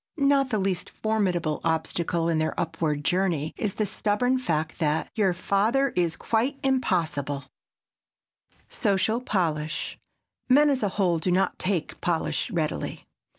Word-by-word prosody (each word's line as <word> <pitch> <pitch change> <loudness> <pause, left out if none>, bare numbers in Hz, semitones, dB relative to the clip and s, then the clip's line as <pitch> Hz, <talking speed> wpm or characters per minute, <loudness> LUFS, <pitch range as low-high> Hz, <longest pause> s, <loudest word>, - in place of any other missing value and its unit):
Not 275 -2 +3
the 220 - 0
least 190 -3 -1
formidable 185 -8 -1
obstacle 165 +1 0
in 165 -2 +1
their 155 0 -1
upward 160 -3 -1
journey 175 -5 +1
is 205 -3 -2
the 215 - 0
stubborn 215 +6 +1
fact 160 -9 -2
that 155 -1 0
"your 205 -4 +2
father 215 +9 +1
is 175 -6 0
quite 250 +5 0
impossible." 165 - 0 1.2
[Sidenote: 200 -4 0
SOCIAL 220 +6 +1
POLISH] 155 -9 -1 0.5
Men, 290 +3 +6
as 265 - 0
a 205 - +1
whole, 175 -5 +2
do 170 - -1
not 185 +2 +1
take 180 -4 -2
polish 175 +4 0
readily. 165 -7 -3
185 Hz, 140 wpm, -26 LUFS, 160-220 Hz, 1.2 s, Men